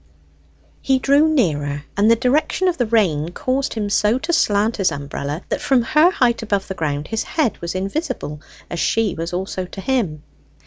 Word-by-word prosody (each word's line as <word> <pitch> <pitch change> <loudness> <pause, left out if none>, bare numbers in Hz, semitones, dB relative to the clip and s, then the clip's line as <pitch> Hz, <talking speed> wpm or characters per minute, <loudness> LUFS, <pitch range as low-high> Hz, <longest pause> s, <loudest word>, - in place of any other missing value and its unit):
He 265 -1 +2
drew 285 +4 +3
nearer, 145 - 0
and 205 +2 +3
the 230 - +6
direction 275 +9 +1
of 350 -5 0
the 245 - +1
rain 175 -9 +1
caused 265 +5 -1
him 215 -2 -2
so 210 +3 +2
to 330 +6 -3
slant 215 -6 +2
his 195 -3 +2
umbrella 145 +3 -5
that 285 - -2
from 270 -4 +3
her 305 +8 +4
height 240 -9 +1
above 200 -3 -1
the - - -4
ground 150 -4 -3
his 225 0 -1
head 310 -9 -1
was 170 +1 -4
invisible, 195 - -3 0.3
as 170 - -5
she 220 +3 +1
was 165 +1 -4
also 185 +1 -3
to 180 - -10
him. 190 - -1
215 Hz, 185 wpm, -20 LUFS, 170-260 Hz, 0.3 s, the